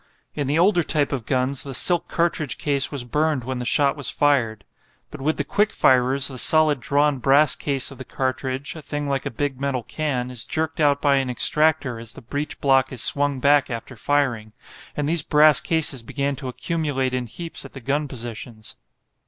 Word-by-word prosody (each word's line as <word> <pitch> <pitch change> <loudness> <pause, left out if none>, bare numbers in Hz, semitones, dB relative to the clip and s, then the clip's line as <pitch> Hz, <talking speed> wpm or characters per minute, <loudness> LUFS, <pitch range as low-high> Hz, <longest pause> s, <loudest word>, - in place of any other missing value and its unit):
In 145 -3 -3
the 145 +3 +1
older 175 +1 +4
type 150 -2 0
of 130 -6 -4
guns 130 0 0
the 135 -2 -4
silk 175 +5 +2
cartridge 165 -5 -1
case 140 -1 +1
was 140 -4 -4
burned 150 +1 0
when 130 +1 -4
the 125 - -4
shot 140 0 +2
was 145 -3 -3
fired. 120 -8 +1 0.5
But 150 - -9
with 155 +3 0
the 145 - -1
quick 210 +8 0
firers 130 +1 +3
the 130 -3 -4
solid 155 -1 +4
drawn 145 +2 +1
brass 140 +4 +4
case 140 -2 -1
of 135 - -12
the - - -6
cartridge, 130 +2 -3
a 160 - -8
thing 145 0 -4
like 135 -1 -2
a - - -2
big 135 +2 -3
metal 135 -3 -2
can, 130 -5 -3
is 120 -3 -1
jerked 160 +6 -3
out 145 -2 +2
by 140 -2 +4
an 135 -1 -1
extractor 145 -1 +3
as 115 -1 -7
the - - -12
breech 145 +6 -5
block 135 -1 +2
is 125 -3 -1
swung 145 -1 +1
back 145 +1 +3
after 120 +2 -6
firing, 120 -4 -1 0.4
and 145 -1 -1
these 165 +1 +3
brass 150 -1 +4
cases 155 -6 0
began 140 +4 -3
to 135 -1 -7
accumulate 130 0 -2
in 125 -1 -2
heaps 165 +8 -5
at - - -12
the 135 - -8
gun 145 +4 -1
positions. 115 -3 -8
140 Hz, 200 wpm, -22 LUFS, 130-150 Hz, 0.5 s, older